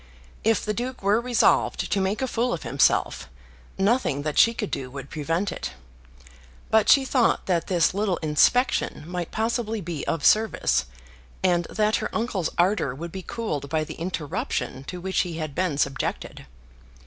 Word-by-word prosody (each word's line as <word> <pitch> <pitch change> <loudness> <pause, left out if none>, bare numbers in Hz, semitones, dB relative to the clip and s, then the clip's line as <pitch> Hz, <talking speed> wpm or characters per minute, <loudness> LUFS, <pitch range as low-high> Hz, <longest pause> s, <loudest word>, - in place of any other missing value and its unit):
If 225 0 +2
the 210 - 0
Duke 250 +1 -5
were 205 +4 +3
resolved 245 -1 +2
to 195 - +2
make 195 +6 -1
a - - 0
fool 240 0 0
of 170 - -4
himself, - - +1 0.5
nothing 195 - +1
that 150 -1 0
she 230 - +7
could 210 - -3
do 130 -1 -3
would 135 +1 -9
prevent 165 +6 -1
it. - - -5 1.0
But 220 -1 +4
she 275 -1 +6
thought 255 -3 +2
that 175 -3 0
this 175 -3 +2
little 200 -2 0
inspection 160 - +2
might 175 0 -4
possibly 225 0 -1
be 165 -5 -5
of 165 - -1
service, 215 - +3 0.6
and 175 -2 +2
that 215 0 +1
her - - -3
uncle's 220 -7 -1
ardour 175 -7 +2
would 170 +4 -7
be 190 - -6
cooled 155 -10 -4
by 155 0 0
the - - -7
interruption 155 -5 -3
to 180 - -6
which 190 +1 -1
he 170 -3 -1
had 155 -3 -4
been 170 -2 -1
subjected. 135 -2 -2
185 Hz, 170 wpm, -25 LUFS, 160-220 Hz, 1.0 s, she